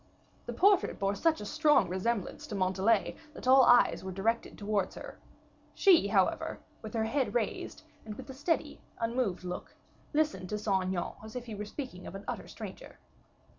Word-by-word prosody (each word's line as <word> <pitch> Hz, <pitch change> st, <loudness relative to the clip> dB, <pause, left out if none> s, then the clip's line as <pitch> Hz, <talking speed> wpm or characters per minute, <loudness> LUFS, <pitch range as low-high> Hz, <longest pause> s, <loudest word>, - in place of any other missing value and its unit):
The -, -, -3 dB
portrait 395 Hz, -1 st, +3 dB
bore 195 Hz, 0 st, 0 dB
such 320 Hz, +5 st, +1 dB
a -, -, -5 dB
strong 300 Hz, -, +3 dB
resemblance 190 Hz, +3 st, -2 dB
to 210 Hz, -, -5 dB
Montalais, 190 Hz, +2 st, +2 dB, 0.2 s
that -, -, -7 dB
all 265 Hz, +1 st, +8 dB
eyes 245 Hz, -5 st, +5 dB
were 190 Hz, -, -5 dB
directed 220 Hz, +5 st, -1 dB
towards 205 Hz, -2 st, -1 dB
her; -, -, -9 dB, 0.6 s
she, 360 Hz, -, +5 dB
however, 195 Hz, -3 st, +1 dB, 0.2 s
with 220 Hz, -1 st, -8 dB
her 220 Hz, -, +1 dB
head 260 Hz, +2 st, -1 dB
raised, 235 Hz, -3 st, -2 dB, 0.2 s
and 215 Hz, -1 st, -7 dB
with -, -, -10 dB
a 265 Hz, -, -7 dB
steady, 295 Hz, +5 st, -1 dB, 0.2 s
unmoved 230 Hz, -5 st, -1 dB
look, 180 Hz, 0 st, -6 dB, 0.4 s
listened 295 Hz, -, 0 dB
to 210 Hz, -, -1 dB
Saint 195 Hz, -3 st, 0 dB
Aignan, 185 Hz, -2 st, -2 dB
as 220 Hz, +1 st, -10 dB
if 245 Hz, -1 st, -5 dB
he 230 Hz, -, -7 dB
were 210 Hz, 0 st, -5 dB
speaking 210 Hz, -6 st, -7 dB
of -, -, -8 dB
an 195 Hz, -, -7 dB
utter -, -, -4 dB
stranger. -, -, -9 dB
220 Hz, 180 wpm, -31 LUFS, 195-255 Hz, 0.6 s, all